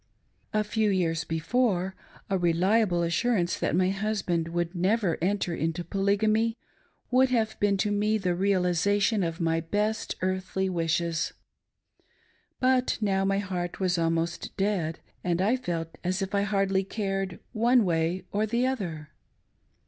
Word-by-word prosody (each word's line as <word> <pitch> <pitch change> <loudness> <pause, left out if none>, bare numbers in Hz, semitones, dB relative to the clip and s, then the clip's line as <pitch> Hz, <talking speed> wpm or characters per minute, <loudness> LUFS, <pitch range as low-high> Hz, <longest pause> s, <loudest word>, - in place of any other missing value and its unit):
A 215 0 +1
fe# 215 0 +1
years 165 -4 0
before, 185 +3 0 0.3
a 195 - 0
reliable 180 +2 +2
assurance 180 +1 +1
that - - 0
my 185 +1 +3
husband 195 -5 -1
vPould 170 +1 -2
never 190 0 +1
enter 185 -1 0
into 165 +1 -2
Polygamy 215 +5 +1 0.5
would 260 +1 +5
have 220 -3 +1
been 200 -1 +2
to 205 +2 0
me 210 +1 +2
the 185 -4 0
realisation 195 +3 +2
of 165 0 -2
my 165 -1 +1
best 210 +6 -1
earthly 185 0 -1
wishes. 170 -1 0 1.3
But 255 0 +2
now 195 -3 +1
my 195 0 +2
heart 180 -3 -3
was 180 -2 +1
almost 165 +1 -1
dead, 190 -5 0 0.3
and 175 -1 0
I 210 +7 +3
felt 170 -10 -4
as 185 +2 0
if 195 - -5
I 200 - +2
hardly 195 -1 +1
cared 195 -2 -3
one 235 0 +4
way 170 +1 0
or 210 +2 0
the 235 +3 +1
other. 175 - -3
190 Hz, 140 wpm, -27 LUFS, 175-210 Hz, 1.3 s, would